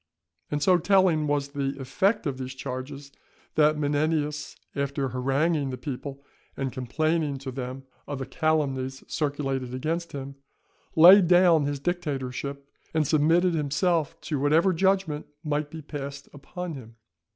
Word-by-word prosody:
And 145 -1 -1
so 180 -2 +5
telling 180 -4 +3
was 145 -1 0
the 140 -1 -3
effect 190 - +1
of 135 -3 -2
these 130 0 -5
charges, 135 +2 -6 0.4
that 150 0 +4
Menenius, 150 0 -1 0.2
after 140 -1 -1
haranguing 135 +4 0
the 130 - -4
people 140 +1 -6 0.3
and 135 -1 -2
complaining 150 +4 -1
to 135 0 -6
them 130 +1 -6 0.2
of 145 - -4
the 135 - -4
calumnies 135 -2 -1
circulated 135 -4 -2
against 165 +6 -2
him, 140 0 -6 0.6
laid 180 +3 +9
down 175 -4 +5
his 145 0 -2
dictatorship, 140 -4 -3 0.3
and 155 -1 +3
submitted 165 +5 +3
himself 160 +1 0
to 150 -4 -2
whatever 160 +7 +3
judgment 190 -4 +1 0.2
might 150 -1 -1
be 160 0 -8
passed 140 -1 -7
upon 175 +4 -6
him. 115 -5 -10
145 Hz, 140 wpm, -26 LUFS, 135-160 Hz, 0.6 s, laid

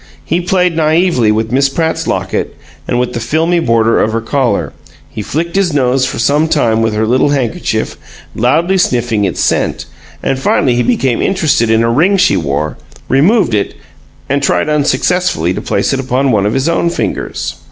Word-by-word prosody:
He 170 +2 0
played 180 -1 +1
naively 160 -7 +2
with 110 +1 -1
Miss 135 +2 +2
Pratt's 160 +3 -2
locket - - -2 0.3
and 120 - 0
with 125 - -1
the - - -3
filmy 160 +9 0
border 115 -6 +2
of 110 - 0
her 115 - 0
collar; 125 +2 -1 0.3
he - - -7
flicked 165 - -3
his 195 -5 +1
nose 130 -1 +2
for - - -5
some 145 +6 +2
time 115 -8 +1
with 110 -1 0
her 110 +1 +1
little 130 +5 +2
handkerchief, 135 -6 -2 0.4
loudly 170 +11 +1
sniffing 120 - +1
its 90 - -2
scent; - - 0 0.4
and 135 -1 -1
finally 130 -1 +1
he 120 - +1
became 135 - 0
interested 155 - +1
in 110 +1 +3
a 115 - +1
ring 175 +11 +3
she 185 0 +3
wore, 75 0 -2 0.3
removed 170 - +3
it, 105 -1 -1 0.5
and 140 +1 0
tried 140 - +1
unsuccessfully 150 - 0
to - - -4
place 100 - -1
it 135 - -1
upon 130 +1 0
one 105 -3 +2
of 105 - -1
his 135 +3 0
own 170 0 +1
fingers. 170 - -4
135 Hz, 185 wpm, -13 LUFS, 115-165 Hz, 0.5 s, in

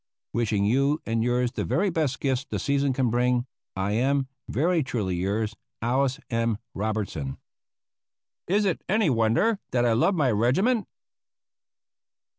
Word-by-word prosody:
"Wishing 110 -4 +1
you 140 +7 +2
and 115 0 0
yours 125 0 +1
the - - -3
very 195 +3 +1
best 155 -5 -1
gifts 135 -1 0
the - - -4
season 140 -1 +1
can 130 -2 +1
bring, 125 +1 +2 0.3
I 95 +2 -1
am, 135 +5 +1 0.2
"Very 165 +7 +2
truly 110 -9 -2
yours, 105 +5 -1 0.2
"ALICE 130 +3 +1
M. 115 -2 +1 0.2
ROBERTSON." 100 -10 -3 1.1
Is 205 +3 +2
it 190 - -1
any 210 -5 +3
wonder 120 - +2
that 120 -1 +1
I 115 - +3
loved 170 - +2
my 135 -5 +3
regiment? 185 - +2
125 Hz, 140 wpm, -26 LUFS, 110-140 Hz, 1.1 s, any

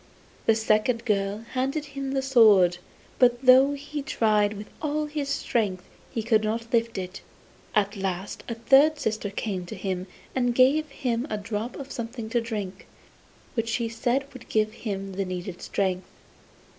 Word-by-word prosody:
The 225 - +6
second 220 +2 +1
girl 205 0 0
handed 270 +4 -1
him 275 -1 -3
the 270 -1 0
sword, 210 -9 +6 0.4
but 245 0 +4
though 260 +2 +7
he 290 +1 -5
tried 215 -7 +2
with 205 0 -7 0.2
all 305 0 0
his 295 -2 -3
strength 210 -9 -1 0.3
he 225 - -3
could 220 -1 +3
not 230 +2 -3
lift 230 -2 +1
it. 185 0 -5 0.5
At 205 0 +2
last 190 0 -4
a 235 - -2
third 275 +6 +5
sister 220 -5 -2
came 195 -2 -3
to - - -6
him 185 -1 -3 0.3
and 245 -2 +1
gave 290 +5 +4
him 250 -1 -2
a 215 - -1
drop 210 +3 -4
of 275 0 -8
something 230 -1 -5
to 240 - +2
drink, 205 -5 -5 0.7
which 230 -2 -1
she 230 +1 0
said 240 +4 0
would 255 - -12
give 215 0 +1
him 195 -4 -4
the 195 +1 -1
needful 180 0 -5
strength. 185 -2 -1
225 Hz, 165 wpm, -26 LUFS, 205-260 Hz, 0.7 s, though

